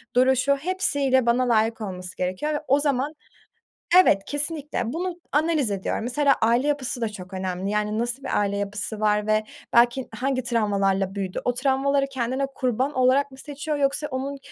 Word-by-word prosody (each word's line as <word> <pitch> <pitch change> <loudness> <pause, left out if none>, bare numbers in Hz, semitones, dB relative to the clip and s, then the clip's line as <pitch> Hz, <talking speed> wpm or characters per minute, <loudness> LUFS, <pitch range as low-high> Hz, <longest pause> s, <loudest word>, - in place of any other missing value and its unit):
duruşu, 260 +2 +4
hepsiyle 280 -6 +1
bana 245 +1 +2
layık 225 0 +2
olması 185 -3 -6
gerekiyor 185 +12 -2
ve 295 - -1
o 275 +2 +4
zaman 285 0 0 0.9
evet, 195 - +3
kesinlikle. 290 -5 -3
Bunu 355 +1 -3
analiz 300 -5 +1
ediyorum. 195 +2 -2
Mesela 275 +4 +3
aile 235 +5 +3
yapısı 270 -4 -2
da 225 - 0
çok 190 -3 -10
önemli. 185 0 -3
Yani, 210 +1 0
nasıl 240 +3 -2
bir 270 - 0
aile 200 -1 0
yapısı 205 +2 -4
var 210 0 +1
ve 215 0 +2 0.3
belki 240 +2 +4
hangi 255 +2 -1
travmalarla 200 -4 0
büyüdü? 190 -2 -3
O 245 - +2
travmaları 275 +2 +1
kendine 260 +1 -1
kurban 255 +3 0
olarak 260 +2 +3
mı 265 - -13
seçiyor 295 +2 -4
yoksa 280 +1 0
onun 275 +1 -4
255 Hz, 165 wpm, -24 LUFS, 210-280 Hz, 0.9 s, duruşu